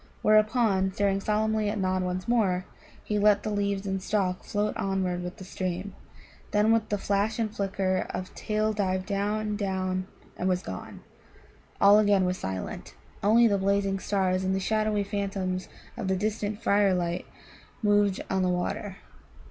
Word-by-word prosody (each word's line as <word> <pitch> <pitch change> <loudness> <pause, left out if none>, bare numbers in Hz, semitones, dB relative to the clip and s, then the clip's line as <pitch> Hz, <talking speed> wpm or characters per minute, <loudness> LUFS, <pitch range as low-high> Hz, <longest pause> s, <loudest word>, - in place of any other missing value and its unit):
Whereupon, 215 -3 +3
staring 195 0 +1
solemnly 215 0 +1
at 210 - -2
Nod 185 -1 0
once 180 0 -3
more, 195 -6 +2 0.4
he 210 -1 -1
let 205 0 +4
the 215 - -2
leaves 200 -1 -1
and 190 -1 -2
stalk 185 -2 -1
float 210 0 -1
onward 190 -2 -1
with 180 +3 -6
the 195 - -9
stream, 185 +1 -4 0.6
then 210 +1 +3
with 225 -1 +1
a 205 - +2
flash 200 +2 0
and 220 -2 -2
flicker 195 -2 -1
of 185 - -5
tail 215 0 -1
dived 190 -3 -1
down, 210 +1 -1
down, 185 -2 -2 0.3
and 185 - 0
was 180 0 0
gone. - - -7 0.8
All 200 +1 +7
again 205 -3 +4
was 180 0 -1
silent. 95 -9 -5 0.3
Only 225 +4 +5
the 200 -3 +3
blazing 195 0 +1
stars 190 -2 0
and 190 0 +1
the - - 0
shadowy 215 +1 +1
phantoms 195 -2 -3 0.3
of - - -4
the 190 - +2
distant 210 +2 -2
firelight 185 -5 +2 0.6
moved 205 -2 +3
on 190 0 0
the 185 - +2
water. 180 +2 -2
200 Hz, 160 wpm, -27 LUFS, 185-210 Hz, 0.8 s, All